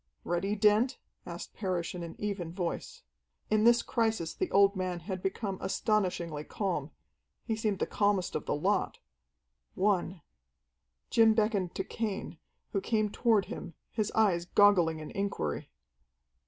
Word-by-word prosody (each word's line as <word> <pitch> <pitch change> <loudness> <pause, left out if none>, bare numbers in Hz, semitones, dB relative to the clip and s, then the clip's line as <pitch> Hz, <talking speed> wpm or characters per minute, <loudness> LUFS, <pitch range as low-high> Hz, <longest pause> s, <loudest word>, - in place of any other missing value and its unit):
"Ready, 195 +4 -1
Dent?" 215 +5 +3 0.3
asked - - -7
Parrish 185 -5 -2
in 180 - -6
an 170 -1 -7
even 195 -5 -3
voice. 175 -1 -4 0.5
In 215 0 +4
this 235 0 +6
crisis 220 -8 0
the 370 - -2
old 200 +1 +5
man 185 -2 -2
had 185 +2 -5
become 195 0 -3
astonishingly 185 -6 0
calm. 170 -6 -2 0.6
He 225 - 0
seemed 215 -2 -1
the - - 0
calmest 200 -3 +1
of - - -3
the - - +1
lot. 190 +6 0 0.8
"One!" 185 -3 0 0.9
Jim 225 -1 +5
beckoned 210 -5 +1
to 190 - -1
Cain, 200 -5 -4 0.3
who 195 - 0
came 215 -2 0
toward 220 -5 +3
him, 165 - -7 0.2
his 215 -2 -1
eyes 190 -6 +3
goggling 175 -5 +4
in 155 - -8
inquiry. 195 - -2
195 Hz, 140 wpm, -30 LUFS, 175-215 Hz, 0.9 s, this